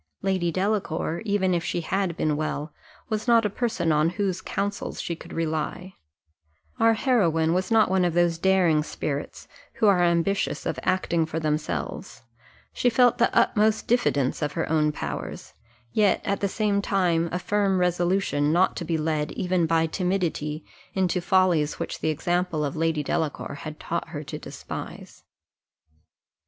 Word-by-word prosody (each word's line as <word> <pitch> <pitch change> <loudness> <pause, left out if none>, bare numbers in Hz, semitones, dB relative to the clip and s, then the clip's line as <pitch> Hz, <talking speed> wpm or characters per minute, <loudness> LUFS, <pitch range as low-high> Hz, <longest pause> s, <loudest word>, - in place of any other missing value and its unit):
Lady 185 -3 +1
Delacour, 185 -4 -1
even 200 -3 +1
if 170 -1 0
she 175 - -2
had 185 0 -1
been 155 -1 +1
well, 155 0 -3 0.4
was 215 +1 -2
not 230 -2 +5
a 210 - 0
person 205 -8 -1
on 155 +1 +3
whose 185 0 -2
counsels 200 0 -3
she 170 - -3
could - - -13
rely; 165 +3 -3 0.9
our 225 0 +5
heroine 170 - +2
was 185 +1 0
not 225 -1 +5
one 190 -1 +2
of 175 -2 0
those 175 -1 +2
daring 180 -4 +3
spirits, 145 -1 -5 0.3
who 220 - 0
are 195 -4 +5
ambitious 175 +3 +1
of - - -2
acting 170 -3 +1
for 160 0 -3
themselves; 155 -1 -3 0.5
she 245 - +2
felt 245 0 +4
the 235 - +4
utmost 215 0 +3
diffidence 145 - +1
of 145 -1 -1
her 165 - -2
own 155 -1 +3
powers, - - -6 0.4
yet 205 -3 +3
at 200 -1 0
the 200 - +1
same 205 0 0
time 175 -4 +1
a 180 - -1
firm 200 0 +1
resolution 175 -4 +1
not 180 +3 +3
to - - -4
be 165 -1 -1
led 155 -1 -1
even 180 -2 0
by 165 0 +2
timidity 165 -4 -2 0.3
into 185 -1 +1
follies 175 -5 +2
which - - -4
the 155 - 0
example 175 0 0
of 140 - -4
Lady 160 -1 0
Delacour 150 +1 -2
had 155 +2 -8
taught 170 0 -3
her 155 -2 -6
to - - -7
despise. - - -8
175 Hz, 160 wpm, -25 LUFS, 160-195 Hz, 0.9 s, not